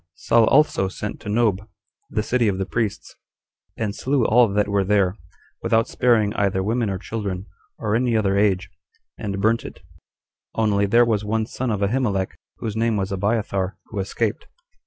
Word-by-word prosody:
Saul 115 -1 +3
also 140 -9 +3
sent 105 +2 -6
to - - -7
Nob, 110 -2 +2
21 105 +3 -16 0.4
the 105 - -1
city 120 0 +1
of 95 -2 0
the 95 - -1
priests, 110 0 -3 0.6
and 110 -3 -2
slew 130 +2 0
all 120 +1 +5
that 105 +1 +1
were 100 -1 +1
there, 100 -1 +2 0.5
without 115 -1 +2
sparing 110 -4 +2
either 95 -2 0
women 115 +1 0
or 95 - -2
children, 100 -2 -4 0.3
or 105 -1 -1
any 120 -1 +2
other 100 -2 +1
age, 100 -2 +1 0.5
and 100 -1 -3
burnt 110 +3 +2
it; - - -10 0.7
only 100 -2 +2
there 120 +4 +5
was 110 -3 0
one 110 +1 0
son 125 +2 -4
of 105 -2 -1
Ahimelech, 100 -4 0 0.2
whose 110 -2 -4
name 115 -1 +1
was 95 -1 -2
Abiathar, 100 -1 -1
who 105 - -3
escaped. 100 +3 -2
105 Hz, 175 wpm, -22 LUFS, 100-115 Hz, 0.7 s, all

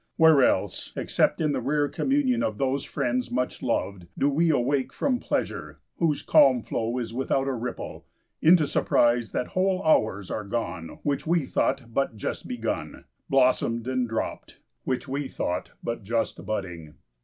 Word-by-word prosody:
Where 160 -3 +7
else - - 0
except - - +1
in 155 -2 +1
the 135 - -1
rare 145 +3 +1
communion 260 - +1
of 110 - -1
those 135 +2 0
friends 125 -3 -1
much 125 +1 -2
loved, 95 -3 -2
do 145 - +2
we 165 +4 +2
awake 135 -1 +1
from 255 -3 0
pleasure, - - -3 0.2
whose 160 -4 +1
calm 130 -4 +5
flow 115 +2 -2
is 115 -2 -4
without 135 +2 0
a 135 - 0
ripple, 125 0 -6 0.3
into 160 -1 +6
surprise 120 -4 +2
that 125 - -2
whole 190 0 +1
hours 110 - +2
are 105 - -2
gone 100 -6 -4
which 145 +1 -1
we 170 -3 +2
thought 130 -3 -1
but 135 -3 0
just - - -4
begun - - -4 0.2
blossomed 125 -3 +2
and 130 -2 0
dropped, 115 - -4 0.3
which 130 +1 -2
we 140 +1 -2
thought 90 -7 -3
but 115 -1 -3
just 115 +3 -2
budding? 90 -7 -5
130 Hz, 160 wpm, -26 LUFS, 115-145 Hz, 0.3 s, Where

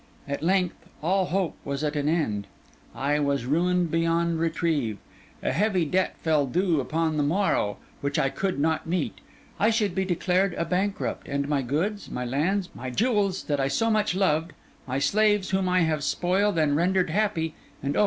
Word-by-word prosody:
At 140 0 -3
length, 180 +1 0 0.2
all 190 +3 +2
hope 185 -2 -1
was 140 +1 -3
at 150 0 -1
an 145 0 0
end; 110 - 0 0.5
I 145 +2 0
was 140 -4 0
ruined 175 +4 +1
beyond 165 0 +1
retrieve; 160 - 0 0.5
a - - +1
heavy 185 +3 +1
debt 185 +5 0
fell 155 -4 +2
due 175 +3 +1
upon 160 +3 0
the - - +2
morrow, 150 - +1 0.2
which 140 0 -2
I 135 - +2
could 190 +5 -2
not 160 +2 0
meet; 160 - -2 0.4
I 215 - +4
should 215 -4 +1
be 190 +1 0
declared 185 +1 +1
a 170 - -1
bankrupt, 190 +4 -2
and 140 0 -1
my 145 -2 +1
goods, 165 - -2
my 125 - -3
lands, 175 +10 0
my 130 +1 -6
jewels 205 - +1
that 145 -1 -1
I 135 - +2
so 225 +12 +1
much 215 -4 +1
loved, 165 -4 +1 0.3
my 130 +1 -1
slaves 205 +6 +2
whom 190 -1 +1
I 180 0 +3
have 155 -3 +1
spoiled 185 +5 +1
and 150 -2 +3
rendered 180 +2 +2
happy, 175 -5 0 0.3
and 140 +1 -1
oh! - - +1
165 Hz, 185 wpm, -26 LUFS, 145-190 Hz, 0.5 s, I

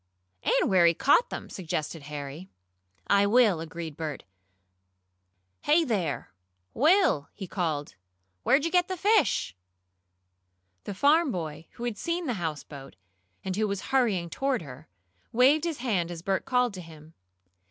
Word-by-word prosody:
"And - - +2
where 180 -3 +5
he 170 - +3
caught 290 - +3
them," - - -6
suggested 165 -3 -4
Harry. 145 +4 -7 0.6
"I 200 0 +3
will," 215 -5 +4
agreed 165 -1 -6
Bert. 155 -3 -5 1.4
"Hey 310 +3 +4
there, 195 - -2 0.4
Will!" 305 - +3
he 200 - -6
called. 160 -6 -3 0.5
"Where'd 280 - +3
you 335 - -1
get 360 -1 +3
the 370 - -4
fish?" 405 - +2 1.3
The 205 - -5
farm 295 - +4
boy, 160 -4 -5
who 235 - -9
had 235 -4 -3
seen 340 +1 -2
the 255 - -1
houseboat, 145 - -6 0.5
and 190 -1 -2
who 215 +1 +1
was 200 -1 -3
hurrying 200 -10 +1
toward 270 -3 -1
her, 140 +2 -11 0.4
waved 270 +7 +4
his 330 -4 -2
hand 205 -9 -1
as 170 -1 -7
Bert 195 0 -1
called 250 -3 +1
to 185 - -7
him. 160 -1 -14
195 Hz, 145 wpm, -27 LUFS, 160-265 Hz, 1.4 s, where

